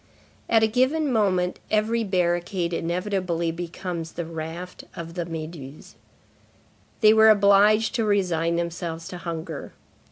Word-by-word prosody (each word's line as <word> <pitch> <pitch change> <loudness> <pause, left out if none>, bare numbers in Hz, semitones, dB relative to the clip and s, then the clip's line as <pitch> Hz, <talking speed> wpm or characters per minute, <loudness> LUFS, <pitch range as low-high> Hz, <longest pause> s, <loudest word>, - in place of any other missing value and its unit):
At 225 -1 +4
a - - +5
given 260 +5 +1
moment, 185 -5 +1
every 220 +2 +1
barricade 175 -2 0
inevitably 175 -1 -1
becomes 170 0 -5
the 170 - -4
raft 165 +2 -7
of 165 0 -7
la 175 -2 -2
Méduse. 155 -4 -8 1.1
They 215 -1 +7
were 220 0 +7
obliged 210 +2 +5
to 235 -3 0
resign 175 -5 +1
themselves 170 -1 -4
to 180 - -7
hunger. 165 -3 -6
180 Hz, 125 wpm, -24 LUFS, 165-210 Hz, 1.1 s, They